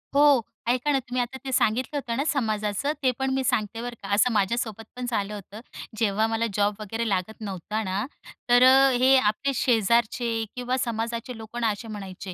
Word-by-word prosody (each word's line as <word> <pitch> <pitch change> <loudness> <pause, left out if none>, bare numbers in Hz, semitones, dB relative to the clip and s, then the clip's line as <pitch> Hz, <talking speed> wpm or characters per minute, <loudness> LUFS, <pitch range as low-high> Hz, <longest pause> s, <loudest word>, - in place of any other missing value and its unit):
हो 285 -4 +6 0.3
ऐका 255 +4 +1
ना. 275 - +2
तुम्ही 250 0 -2
आता 245 +2 -4
ते 265 - -3
सांगितलं 255 +4 +1
होतं 235 -4 -3
ना 280 - +1
समाजाचं 220 0 0
ते 255 - +4
पण 265 - 0
मी 265 0 0
सांगते 220 -1 -1
बरं 245 0 -5
का. 195 - -6
असं 220 +5 +4
माझ्यासोबत 220 +2 -1
पण 250 0 -4
झालं 210 -2 -2
होतं. 205 +2 -9 0.4
जेव्हा 215 0 +1
मला 225 +1 0
जॉब 205 +1 +1
वगैरे 225 +2 -3
लागत 195 +3 -1
नव्हता 210 +2 -4
ना 190 +4 -2 0.4
तर 245 +1 +6
अ, 265 +1 +7
हे 255 +2 +5
आपले 255 +4 +1
शेजारचे 235 +1 +2 0.3
किंवा 250 +1 -1
समाजाचे 235 0 -3
लोक 220 +2 -9
ना 225 - +3
असे 215 +3 -7
म्हणायचे, 195 -3 -7
230 Hz, 190 wpm, -25 LUFS, 210-255 Hz, 0.4 s, अ